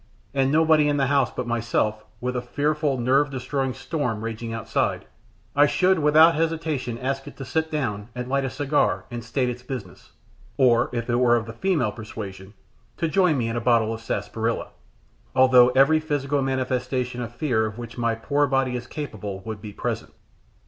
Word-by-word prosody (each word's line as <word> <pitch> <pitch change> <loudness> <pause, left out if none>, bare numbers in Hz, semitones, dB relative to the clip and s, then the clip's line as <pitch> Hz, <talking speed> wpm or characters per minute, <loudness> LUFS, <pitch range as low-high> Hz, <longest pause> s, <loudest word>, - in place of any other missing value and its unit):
and 135 -1 +2
nobody 155 -1 +4
in 145 - +1
the 135 - +2
house 140 -2 +2
but 125 - -5
myself, 110 -2 -1 0.2
with 125 +1 -3
a 125 - -1
fearful, 145 +2 0
nerve 135 +4 +2
destroying 135 0 -2
storm 130 -4 -3
raging 115 0 -4
outside, 115 0 -1 0.5
I 145 +1 +6
should 185 +3 +2
without 155 +2 +6
hesitation 155 -7 -1
ask 135 +2 -3
it - - -10
to 135 - -6
sit 160 +5 -1
down 115 -9 -3
and 125 0 -4
light 140 +1 0
a 135 - -1
cigar 145 +2 0
and 120 -1 -5
state 125 +3 -1
its 125 0 -4
business 125 -8 -8 0.4
or, 120 -3 +4
if 115 -1 -3
it 120 -1 +1
were 120 -1 +4
of 115 -2 -1
the 115 - -8
female 145 - 0
persuasion, 105 -2 -8 0.4
to 165 - 0
join 180 -2 +3
me 120 -3 0
in 115 - -2
a 120 - -1
bottle 115 -2 +3
of 115 - -7
sarsaparilla 115 0 -2 0.7
although 130 -1 +7
every 135 +5 +4
physical 145 -2 -1
manifestation 130 -1 -1
of 120 0 -6
fear 120 -5 +1
of 110 0 -8
which 120 -1 -8
my 115 -1 +1
poor 145 +5 +1
body 135 -1 +1
is 120 0 -5
capable 105 -10 -6
would 110 +1 -7
be 105 -1 -7
present. - - -4
125 Hz, 185 wpm, -24 LUFS, 115-145 Hz, 0.7 s, although